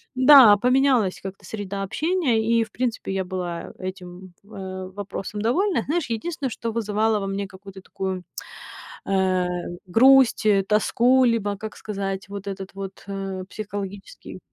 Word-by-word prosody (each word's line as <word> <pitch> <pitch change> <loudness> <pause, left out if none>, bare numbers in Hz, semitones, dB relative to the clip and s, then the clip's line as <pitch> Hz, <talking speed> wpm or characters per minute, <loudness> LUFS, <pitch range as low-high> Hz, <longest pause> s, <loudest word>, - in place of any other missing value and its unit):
Да, 255 -5 +8
поменялась 250 -4 +2
как-то 195 0 -8
среда 200 -2 -5
общения, 290 - 0
и, 230 0 +3
в 220 - -11
принципе, 235 -5 -3
я 190 -1 -1
была 180 -2 -5
этим, 185 -1 -8
э, 190 -2 -7
вопросом 205 +1 -6
довольна. 320 - +1
Знаешь, 310 -3 -2
единственное, 270 +4 -3
что 230 0 -4
вызывало 215 -1 0
во 195 - -4
мне 195 0 -3
какую-то 190 0 -12
такую, 190 -1 -5 0.8
э, 190 -2 +1 0.4
грусть, 255 +4 +5
э, 200 -2 +4
тоску 240 +5 +3
либо, 210 -4 +1
как 215 +1 -8
сказать, 195 -2 -4
вот 200 0 -7
этот 195 -1 -6
вот, 195 0 -8
э, 195 -1 -5
психологический, 200 -2 -7
205 Hz, 140 wpm, -23 LUFS, 190-230 Hz, 0.8 s, Да